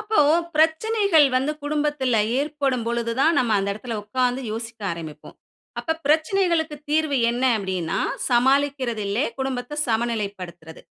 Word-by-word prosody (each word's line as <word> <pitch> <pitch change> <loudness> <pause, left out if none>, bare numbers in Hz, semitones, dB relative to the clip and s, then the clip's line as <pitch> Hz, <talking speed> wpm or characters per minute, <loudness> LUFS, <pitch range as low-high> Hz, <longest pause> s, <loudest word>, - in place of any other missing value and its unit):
அப்போ 435 0 -1 0.4
பிரச்சனைகள் 325 +2 +3
வந்து 270 +4 0
குடும்பத்தில 290 -5 0 0.2
ஏற்படும் 280 -5 -1
பொழுது 235 0 -1
தான், 320 +4 +4
நம்ம 240 -3 +1
அந்த 195 0 -1
இடத்தில 225 +2 -6
உட்கார்ந்து 250 +4 -1
யோசிக்க 225 0 -6
ஆரம்பிப்போம். 160 -3 -9 0.4
அப்ப 320 - -1
பிரச்சனைகளுக்கு 320 0 +1
தீர்வு 310 -2 +1
என்ன 245 +2 -3 0.2
அப்படின்னா, 185 -5 -2 0.3
சமாளிக்கிறது 260 -2 +2
இல்ல, 200 +3 -2 0.2
குடும்பத்தை 265 +1 -3
சமநிலைப்படுத்துறது. 200 -8 -3
255 Hz, 120 wpm, -23 LUFS, 225-300 Hz, 0.4 s, தான்